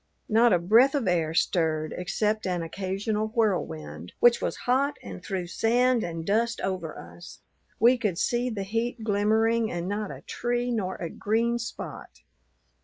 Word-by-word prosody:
Not 230 Hz, +2 st, +4 dB
a 180 Hz, -, +5 dB
breath 225 Hz, -, +4 dB
of 265 Hz, -8 st, 0 dB
air 165 Hz, -3 st, +1 dB
stirred 160 Hz, -3 st, +1 dB
except 210 Hz, +4 st, -1 dB
an 180 Hz, -2 st, -1 dB
occasional 200 Hz, +5 st, -2 dB
whirlwind, 85 Hz, -, -2 dB
which 240 Hz, 0 st, +5 dB
was -, -, -1 dB
hot 270 Hz, +3 st, +1 dB
and 95 Hz, -3 st, -9 dB
threw 185 Hz, -2 st, -3 dB
sand 240 Hz, +6 st, +2 dB
and 165 Hz, -1 st, -5 dB
dust 225 Hz, +4 st, +1 dB
over 185 Hz, -5 st, -3 dB
us. 85 Hz, +1 st, -12 dB, 0.4 s
We 240 Hz, +3 st, +5 dB
could 200 Hz, -7 st, -1 dB
see 240 Hz, +5 st, 0 dB
the 210 Hz, -4 st, -3 dB
heat 225 Hz, +3 st, -2 dB
glimmering, 220 Hz, +2 st, +2 dB
and 175 Hz, 0 st, -3 dB
not 205 Hz, +1 st, -2 dB
a -, -, -8 dB
tree 245 Hz, 0 st, -2 dB
nor 195 Hz, -5 st, -2 dB
a 170 Hz, -, -5 dB
green 230 Hz, +3 st, 0 dB
spot. 230 Hz, -, -8 dB
210 Hz, 160 wpm, -27 LUFS, 175-230 Hz, 0.4 s, a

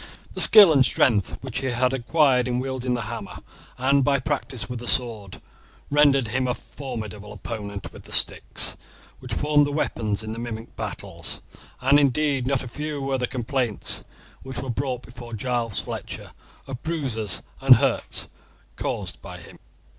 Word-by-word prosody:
The -, -, +4 dB
skill 205 Hz, -7 st, +10 dB
and 135 Hz, -3 st, +6 dB
strength 115 Hz, -5 st, +2 dB
which 130 Hz, -2 st, -3 dB
he 135 Hz, -, -2 dB
had 125 Hz, +1 st, +1 dB
acquired 130 Hz, 0 st, +3 dB
in 125 Hz, -1 st, 0 dB
wielding 130 Hz, -1 st, -2 dB
the 120 Hz, -, -2 dB
hammer, 110 Hz, -, -6 dB, 0.4 s
and 135 Hz, +2 st, +3 dB
by 140 Hz, +1 st, +3 dB
practice 125 Hz, -1 st, -3 dB
with 125 Hz, -1 st, -5 dB
the 120 Hz, -, -8 dB
sword 110 Hz, -5 st, -1 dB, 0.5 s
rendered 140 Hz, -5 st, +4 dB
him 130 Hz, +3 st, 0 dB
a 125 Hz, -, 0 dB
formidable 110 Hz, -6 st, -7 dB
opponent 105 Hz, -1 st, -6 dB
with -, -, -13 dB
the -, -, -15 dB
sticks, -, -, +1 dB, 0.4 s
which -, -, -5 dB
formed 145 Hz, 0 st, +3 dB
the -, -, -3 dB
weapons 110 Hz, -8 st, -1 dB
in 110 Hz, -, -5 dB
the 115 Hz, -, -5 dB
mimic 115 Hz, -1 st, -6 dB
battles, -, -, -5 dB, 0.4 s
and 135 Hz, +3 st, +5 dB
indeed 140 Hz, -1 st, +1 dB
not 135 Hz, -1 st, +1 dB
a -, -, -7 dB
few 150 Hz, +4 st, -4 dB
were 135 Hz, -1 st, -1 dB
the 125 Hz, -, 0 dB
complaints 125 Hz, -3 st, -1 dB, 0.4 s
which 130 Hz, -2 st, -8 dB
were 130 Hz, 0 st, -3 dB
brought 130 Hz, 0 st, -3 dB
before 120 Hz, -1 st, -11 dB
Giles 115 Hz, 0 st, -1 dB
Fletcher -, -, -6 dB, 0.3 s
of 135 Hz, -2 st, -7 dB
bruises 115 Hz, -, -2 dB, 0.2 s
and 135 Hz, -1 st, +9 dB
hurts 130 Hz, +1 st, 0 dB, 0.5 s
caused -, -, -4 dB
by -, -, -9 dB
him. -, -, -13 dB
125 Hz, 165 wpm, -24 LUFS, 115-135 Hz, 0.5 s, skill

